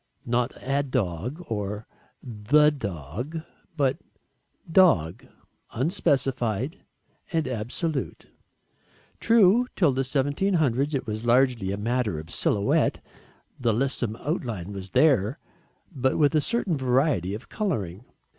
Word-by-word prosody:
Not 120 +1 0
"a 140 +2 +1
dog" 125 - -3
or 105 -1 -4 0.4
"the 130 +6 +3
dog" 115 - -5 0.4
but 135 -3 +2 0.7
"dog" 145 - +3 0.5
unspecified 135 - 0 0.5
and 165 -2 0
absolute. 130 +6 -3 0.9
True, 230 +1 +4
till 170 -6 +4
1700 140 +1 +1
it 135 - -2
was 110 0 -4
largely 120 -5 +2
a 100 - -2
matter 115 -4 -1
of 80 +1 -9
silhouette, 100 +4 +1 0.6
the 120 -3 +1
lissom 120 -3 0
outline 115 - -4
was 95 -1 -7
there, 125 - +3 0.6
but 130 0 +1
with 150 0 +3
a 155 - +3
certain 220 -3 0
variety 130 - +1
of 115 - -10
colouring. 110 - -3
130 Hz, 110 wpm, -26 LUFS, 105-150 Hz, 0.9 s, True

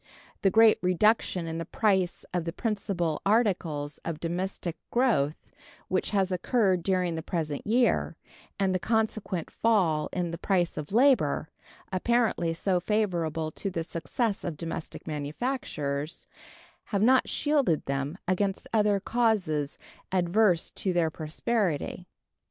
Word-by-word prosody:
The 195 - +4
great 225 +2 +6
reduction 185 -1 +2
in 165 0 -4
the - - -2
price 190 0 0
of 175 -2 0
the 165 - -3
principal 185 -6 -2
articles 180 -9 +1
of 165 -2 -4
domestic 175 0 -3
growth 220 - +1 0.4
which 185 - 0
has 195 -2 +1
occurred 185 0 +2
during 180 -1 +1
the 160 - -3
present 155 -3 -3
year, 240 +3 +2 0.4
and 190 -1 +2
the 185 - +1
consequent 215 -3 -1
fall 180 -9 +2
in 175 -2 -2
the 170 - -6
price 180 -4 +1
of 150 +2 -6
labor, 225 - +3 0.4
apparently 220 -4 +1
so 180 +2 +1
favorable 170 -6 -1
to 195 - -4
the 170 -3 -3
success 195 +6 -2
of 165 -4 -4
domestic 165 -1 -6
manufactures, 150 - -3 0.6
have 200 -1 0
not 255 +2 +4
shielded 280 - +1
them 140 +4 -2
against 190 +1 0
other 210 -2 +3
causes 190 -11 0 0.3
adverse 180 0 +2
to 190 - -2
their 165 -2 +2
prosperity. 175 +1 -2
180 Hz, 130 wpm, -28 LUFS, 165-215 Hz, 0.6 s, great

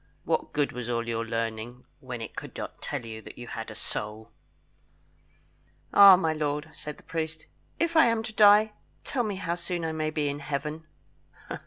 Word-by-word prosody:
"What - - 0
good 145 -1 +1
was 125 -1 -5
all 115 -1 -1
your 115 -1 -1
learning, 115 +2 -4
when 125 -4 -6
it 110 - -7
could - - -7
not - - -6
tell 120 - -4
you 110 -1 -7
that - - -12
you 120 - -7
had 115 -1 -5
a 110 - -8
soul?" 105 +1 -5 1.6
"Ah, 200 -2 +11
my 165 -3 +1
lord," 150 0 -2
said 150 +1 -7
the - - -18
priest, 160 -1 -4 0.3
"If 335 0 0
I 320 -6 +7
am 230 -1 +1
to 220 -1 -5
die, 210 +1 +7 0.3
tell 260 - -1
me 210 -4 -2
how 170 -3 -2
soon 175 -1 -3
I 160 - -1
may 155 -1 -1
be 155 -2 -1
in 145 0 -2
Heaven?" 150 +2 -4
150 Hz, 190 wpm, -28 LUFS, 120-175 Hz, 1.6 s, Ah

